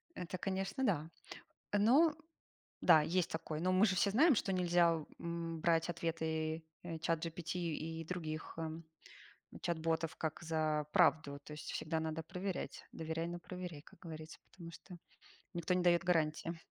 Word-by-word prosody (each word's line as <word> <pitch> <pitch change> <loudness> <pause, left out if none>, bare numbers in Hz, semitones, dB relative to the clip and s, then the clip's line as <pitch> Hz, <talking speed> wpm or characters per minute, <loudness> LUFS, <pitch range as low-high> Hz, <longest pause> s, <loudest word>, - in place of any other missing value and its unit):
Это, 180 +1 -4
конечно, 195 +7 -1
да. 165 - +1 0.7
Ну 275 +10 +6 0.7
да, 160 -3 +7
есть 175 +3 +1
такой. 155 -1 -3
Но 185 +2 +2
мы 185 +4 +6
же 190 -3 +1
все 200 - +3
знаем, 285 - +6
что 200 -3 0
нельзя 175 -3 +3 0.2
м 170 -1 -4
брать 165 0 +3
ответы, 160 -1 -2 0.2
э, 165 -2 -5
чат 165 0 0
GPT 165 +1 -4
и 165 -1 -3
других, 160 -2 -4
м, 160 0 -4 0.8
чат-ботов 165 -1 0
как 160 +1 -3
за 155 -2 0
правду. 145 -3 +4
То - - -9
есть, 150 - -6
всегда 160 0 -1
надо 160 0 -2
проверять. 180 +3 -4
Доверяй, 160 +1 -3
но 175 0 -4
проверяй, 175 -4 -7
как - - -18
говорится, 160 -2 -8
потому 170 -3 -9
что 180 +2 -11 0.6
никто 170 +1 0
не 180 0 +2
дает 175 -1 +4
гарантии. 165 -1 +1
165 Hz, 155 wpm, -36 LUFS, 160-180 Hz, 0.8 s, да